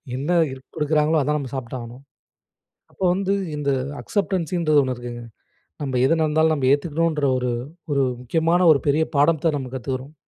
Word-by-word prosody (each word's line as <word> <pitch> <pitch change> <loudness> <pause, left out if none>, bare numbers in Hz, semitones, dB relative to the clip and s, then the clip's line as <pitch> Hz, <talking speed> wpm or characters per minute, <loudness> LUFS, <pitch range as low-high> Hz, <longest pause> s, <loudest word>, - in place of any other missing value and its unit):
என்ன 140 +5 -4 0.2
இருக் 130 0 -10
கொடுக்குறாங்களோ! 155 0 +2
அதான் 150 +2 0
நம்ம 135 -4 -5
சாப்பிட்டு 130 -1 -5
ஆகணும். 120 +2 -10 0.9
அப்போ - - -7
வந்து 195 +1 0 0.2
இந்த 145 -1 -2 0.3
அக்சப்டன்ஸின்றது 175 -6 +1
ஒண்ணு 130 -2 -2
இருக்குங்க. 120 0 -7 0.6
நம்ம 130 -3 -1
எது 135 - +3
நடந்தாலும் 160 +1 +3
நம்ம 135 -4 +1
ஏத்துக்கணுன்ற 155 +1 +1
ஒரு 125 -1 -1 0.4
ஒரு 140 -1 +2 0.2
முக்கியமான 165 +7 +1
ஒரு 140 -4 +3
பெரிய 150 +3 +3
பாடத்த 155 +2 +3
நம்ம 130 -2 -5
கத்துக்கிறோம். 130 +3 -5
145 Hz, 150 wpm, -22 LUFS, 130-160 Hz, 0.9 s, எது